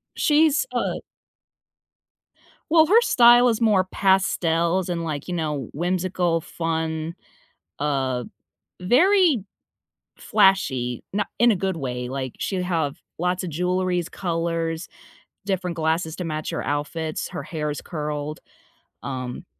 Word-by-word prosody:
She's 305 Hz, -, +3 dB
a -, -, -1 dB, 1.7 s
Well, 320 Hz, -1 st, +6 dB
her 440 Hz, +7 st, +6 dB
style 240 Hz, -, +6 dB
is 230 Hz, 0 st, -1 dB
more 210 Hz, -5 st, +4 dB
pastels, 185 Hz, -2 st, +1 dB
and, 170 Hz, -1 st, -2 dB
like, 150 Hz, -4 st, -4 dB
you 180 Hz, -, -3 dB
know, 150 Hz, -6 st, -2 dB
wh -, -, -14 dB
whimsical, 175 Hz, 0 st, 0 dB
fun, 160 Hz, -1 st, -3 dB, 0.6 s
uh, 135 Hz, -4 st, -1 dB, 0.6 s
very 305 Hz, -, +4 dB, 0.7 s
flashy, 130 Hz, -11 st, +2 dB
no 205 Hz, +1 st, 0 dB
in 240 Hz, +1 st, +5 dB
a 215 Hz, -, +2 dB
good 190 Hz, 0 st, -2 dB
way, 125 Hz, -4 st, -4 dB
like, 130 Hz, -1 st, -4 dB
she'd 190 Hz, -2 st, -2 dB
have 165 Hz, -3 st, -1 dB, 0.2 s
lots 180 Hz, +2 st, 0 dB
of 180 Hz, -, -4 dB
jewelries, 180 Hz, +1 st, -1 dB
colors, 165 Hz, -2 st, -2 dB, 0.6 s
different 185 Hz, -3 st, -1 dB
glasses 160 Hz, 0 st, 0 dB
to 180 Hz, -, -4 dB
match 155 Hz, -2 st, -3 dB
her -, -, -3 dB
outfits, 150 Hz, +2 st, -3 dB
her -, -, -6 dB
hair 150 Hz, -2 st, -3 dB
is 145 Hz, -, -4 dB
curled. 150 Hz, -1 st, -4 dB, 0.6 s
Um, 130 Hz, -2 st, -5 dB
170 Hz, 125 wpm, -23 LUFS, 150-190 Hz, 1.7 s, Well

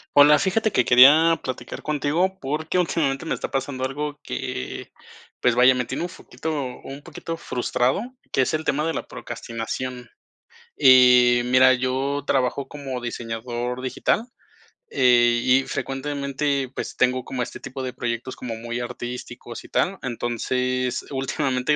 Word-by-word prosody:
Hola, 145 Hz, +1 st, +8 dB
fíjate 210 Hz, +6 st, +1 dB
que 125 Hz, -, +2 dB
quería 150 Hz, +7 st, +7 dB
platicar 130 Hz, -, -6 dB
contigo 155 Hz, +6 st, 0 dB
porque, 155 Hz, +5 st, -2 dB
últimamente 160 Hz, -5 st, 0 dB
me -, -, -1 dB
está -, -, -4 dB
pasando 135 Hz, -1 st, -3 dB
algo 145 Hz, +2 st, -3 dB
que, 65 Hz, 0 st, -5 dB, 0.5 s
pues 125 Hz, -1 st, +3 dB
vaya, 125 Hz, +1 st, +6 dB
me 125 Hz, -1 st, -1 dB
tiene -, -, -4 dB
un 175 Hz, -, -3 dB
poquito 160 Hz, -2 st, -7 dB, 0.3 s
un 135 Hz, +1 st, -8 dB
poquito 165 Hz, +1 st, -6 dB
frustrado, 125 Hz, -2 st, -1 dB, 0.3 s
que -, -, +2 dB
es 130 Hz, -, 0 dB
el 155 Hz, 0 st, -1 dB
tema 150 Hz, 0 st, 0 dB
de 165 Hz, -, -1 dB
la -, -, -5 dB
procrastinación, 120 Hz, +2 st, -6 dB, 0.7 s
Em, 125 Hz, -2 st, +6 dB
mira, 130 Hz, 0 st, +6 dB
yo 130 Hz, +3 st, -1 dB
trabajo 135 Hz, 0 st, 0 dB
como 135 Hz, -3 st, -6 dB
diseñador 120 Hz, +1 st, -4 dB
digital, 215 Hz, -, -1 dB, 0.6 s
eh, 120 Hz, -2 st, +4 dB
y 130 Hz, +1 st, +4 dB
frecuentemente, 140 Hz, 0 st, -2 dB
pues, -, -, -5 dB
tengo 125 Hz, 0 st, +1 dB
como 130 Hz, -2 st, -3 dB
este 120 Hz, -, -8 dB
tipo 135 Hz, 0 st, -7 dB
de 130 Hz, -, -3 dB
proyectos 120 Hz, 0 st, -4 dB
como 120 Hz, -3 st, -5 dB
muy 120 Hz, +2 st, -5 dB
artísticos 120 Hz, -1 st, -7 dB
y -, -, -14 dB
tal. 195 Hz, +2 st, 0 dB
Entonces, 125 Hz, +1 st, -1 dB
últimamente, 135 Hz, 0 st, 0 dB
130 Hz, 145 wpm, -23 LUFS, 125-145 Hz, 0.7 s, Hola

